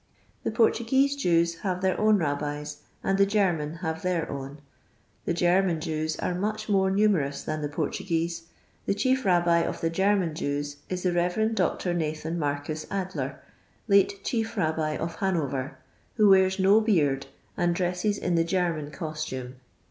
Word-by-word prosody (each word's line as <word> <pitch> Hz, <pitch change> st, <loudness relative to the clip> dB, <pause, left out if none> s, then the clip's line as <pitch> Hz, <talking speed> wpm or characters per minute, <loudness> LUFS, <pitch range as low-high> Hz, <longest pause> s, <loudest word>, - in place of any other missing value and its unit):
The -, -, -2 dB
Portuguese 235 Hz, +5 st, +2 dB
Jews 170 Hz, -9 st, +2 dB
have 185 Hz, -1 st, -2 dB
their 190 Hz, -1 st, +2 dB
own 215 Hz, 0 st, +5 dB
Rabbis, 150 Hz, -2 st, -3 dB, 0.3 s
and 195 Hz, 0 st, +1 dB
the 200 Hz, -, +6 dB
German 175 Hz, -7 st, +1 dB
have 160 Hz, 0 st, -2 dB
their 180 Hz, -3 st, -1 dB
own. 140 Hz, +1 st, -6 dB, 0.7 s
The -, -, 0 dB
German 175 Hz, 0 st, +2 dB
Jews 155 Hz, 0 st, -2 dB
are -, -, -2 dB
much 215 Hz, +4 st, -2 dB
more 195 Hz, -2 st, +3 dB
numerous 190 Hz, -8 st, +1 dB
than 155 Hz, 0 st, -3 dB
the 145 Hz, -, -2 dB
Portuguese; 165 Hz, +1 st, -2 dB, 0.4 s
the 200 Hz, -, +1 dB
chief 260 Hz, +5 st, +1 dB
Rabbi 175 Hz, -2 st, +4 dB
of 170 Hz, -, -2 dB
tlie 165 Hz, -, 0 dB
German 190 Hz, -2 st, +1 dB
Jews 145 Hz, -1 st, -3 dB
is 180 Hz, -1 st, -3 dB
the 180 Hz, -, +2 dB
Rev. 180 Hz, +6 st, +1 dB
Dr. 180 Hz, -4 st, 0 dB
Nathan 160 Hz, 0 st, -2 dB
Marcus 145 Hz, +1 st, -3 dB
Adler, 190 Hz, -1 st, -4 dB, 0.5 s
late 200 Hz, -1 st, +3 dB
Chief 225 Hz, -1 st, -2 dB
Rabbi 155 Hz, -3 st, 0 dB
of 165 Hz, 0 st, -4 dB
Hanover, 145 Hz, -8 st, -1 dB, 0.4 s
who 215 Hz, -3 st, +5 dB
wears 190 Hz, 0 st, +5 dB
no 200 Hz, +3 st, +5 dB
beard, 145 Hz, -11 st, +1 dB, 0.3 s
and 175 Hz, -2 st, +1 dB
dresses 180 Hz, +3 st, 0 dB
in 180 Hz, -, -1 dB
the 165 Hz, -1 st, +3 dB
Gennan 165 Hz, -4 st, -1 dB
costume. 140 Hz, -4 st, -5 dB
175 Hz, 155 wpm, -27 LUFS, 155-195 Hz, 0.7 s, the